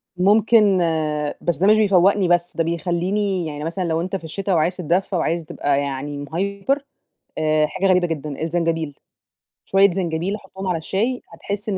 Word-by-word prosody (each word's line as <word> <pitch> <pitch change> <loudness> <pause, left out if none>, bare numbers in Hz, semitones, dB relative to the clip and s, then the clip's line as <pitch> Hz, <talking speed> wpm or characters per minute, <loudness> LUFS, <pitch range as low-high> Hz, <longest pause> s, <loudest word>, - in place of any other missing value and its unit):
ممكن 205 +1 +4 0.6
بس 170 -5 -1
ده 190 +4 +2
مش 215 - +7
بيفوقني 195 -2 +4
بس، 175 0 +1
ده 165 - +2
بيخليني 175 +2 -1
يعني 150 -1 -6
مثلًا 170 +4 -3
لو 165 -1 0
أنت 185 +2 -3
في 180 - -5
الشتا 195 +4 -3
وعايز 170 +3 +1
تتدفا 180 +2 0
وعايز 165 0 -1
تبقى 140 -2 0
يعني 140 +1 -4
مهيبر 200 - -2 0.5
آآ، 155 -1 +2
حاجة 195 - -2
غريبة 180 -2 +4
جدًا، 155 -2 -5
الزنجبيل! 165 -3 -1 0.7
شوية 195 0 +4
زنجبيل 175 +1 -2
أحطهم 195 -2 -8
على 175 -2 0
الشاي، 220 +10 -1
حتحس 205 +1 -6
إن 190 - -1
175 Hz, 165 wpm, -21 LUFS, 160-195 Hz, 0.7 s, مش